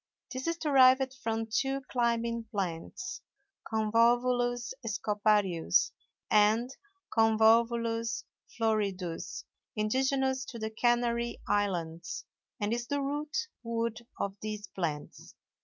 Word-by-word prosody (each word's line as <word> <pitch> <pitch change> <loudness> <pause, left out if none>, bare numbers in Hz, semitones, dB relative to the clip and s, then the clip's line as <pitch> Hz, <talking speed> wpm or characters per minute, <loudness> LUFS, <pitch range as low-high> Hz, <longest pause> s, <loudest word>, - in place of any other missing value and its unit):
This 260 +3 -4
is 335 0 0
derived 265 -3 +5
from 225 -3 -2
two 270 +5 0
climbing 235 -1 0
plants, 195 - -4 0.5
Convolvulus 240 +2 +2
scoparius 210 -4 +2 0.4
and 220 +5 +4 0.4
Convolvulus 230 +1 +3 0.3
floridus, 200 -6 -1 0.3
indigenous 265 +4 +1
to 240 - -8
the 220 -1 -3
Canary 235 0 +1
islands, 175 -5 -1 0.3
and 210 +1 0
is 235 0 -2
the 285 - 0
root 295 +11 -2
wood 230 -1 -2 0.2
of 195 -1 -2
these 215 -1 -4
plants. 155 -5 -5
230 Hz, 95 wpm, -30 LUFS, 210-245 Hz, 0.5 s, derived